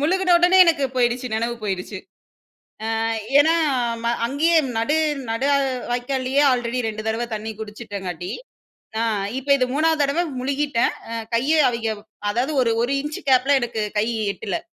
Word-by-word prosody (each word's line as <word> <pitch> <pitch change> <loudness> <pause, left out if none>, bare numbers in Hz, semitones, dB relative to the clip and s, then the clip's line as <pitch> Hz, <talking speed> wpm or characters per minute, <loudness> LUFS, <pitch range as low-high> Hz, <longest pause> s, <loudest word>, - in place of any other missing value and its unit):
முழுகின 360 +4 +2
உடனே 355 +2 +4
எனக்கு 325 -5 +2
போயிடுச்சு 245 0 +1
நினைவு 230 +2 -1
போயிடுச்சு. 190 -3 -4 1.0
அ - - -1 0.4
ஏன்னா 320 +3 +5 0.5
ப - - 0 0.2
அங்கேயே 300 +7 +1 0.2
நடு 280 +7 +1 0.3
நடு 230 +5 0 0.4
வாய்க்காலயே 260 +2 0
ஆல்ரெடி 245 0 -1
2 215 0 -5
தடவை 225 +2 -1
தண்ணி 215 +1 -4
குடிச்சிட்டங்காட்டி, 200 -5 -6 0.7
அ - - +1 0.4
இப்ப 270 +2 -9
இது 255 -2 +1
3வது 315 +1 +2
தடவை 285 +5 +1 0.2
முழுகிட்டேன். 275 -2 0 0.2
அ - - -5 0.2
கையை 290 +7 +2
அவய்ங்க 230 -2 -2 0.4
அதாவது 250 +8 -1
ஒரு 230 -2 +1
ஒரு 255 +3 0
இன்ச்சு 295 +1 -6
கேப்பில 265 +2 +4
எனக்கு 230 -2 -3 0.2
கை 215 - +2 0.3
எட்டல, 200 -4 -4
250 Hz, 145 wpm, -22 LUFS, 225-290 Hz, 1.0 s, ஏன்னா